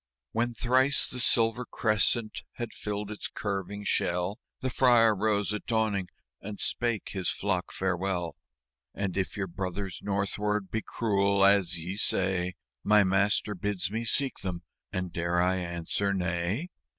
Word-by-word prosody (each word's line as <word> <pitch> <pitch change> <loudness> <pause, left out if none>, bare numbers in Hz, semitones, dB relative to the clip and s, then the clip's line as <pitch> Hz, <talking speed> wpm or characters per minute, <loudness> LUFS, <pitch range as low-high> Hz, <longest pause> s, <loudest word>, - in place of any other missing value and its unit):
When 120 +1 0
thrice 130 +4 +3
the 125 - -4
silver 115 0 +3
crescent 110 -1 +1
had 120 -2 -5
filled 105 0 -3
its 105 - -4
curving 100 0 -4
shell, 90 +2 0 0.2
The 130 - -1
Friar 120 -3 +5
rose 105 -1 +1
at 105 - -5
dawning 110 -4 +1 0.3
and 105 0 -7
spake 120 -3 -1
his 95 -3 -1
flock 95 -3 -1
farewell: 95 -2 -1 0.3
" 60 0 -46
And 100 -3 -2
if 95 0 -1
your 100 - 0
Brothers 95 +1 -4
northward 100 0 -1
be 110 - -1
cruel, 100 -3 +2
as 100 -3 +4
ye 90 +4 -5
say, 90 -3 +1 0.3
My 105 0 +6
Master 100 +2 +2
bids 95 -1 -2
me 115 +2 -2
seek 135 +4 +1
them 90 -2 -4 0.3
and 90 -2 -3
dare 85 +1 0
I 90 +1 +3
answer 90 +3 -1
'Nay'?" 90 - -1
100 Hz, 150 wpm, -29 LUFS, 95-110 Hz, 0.3 s, My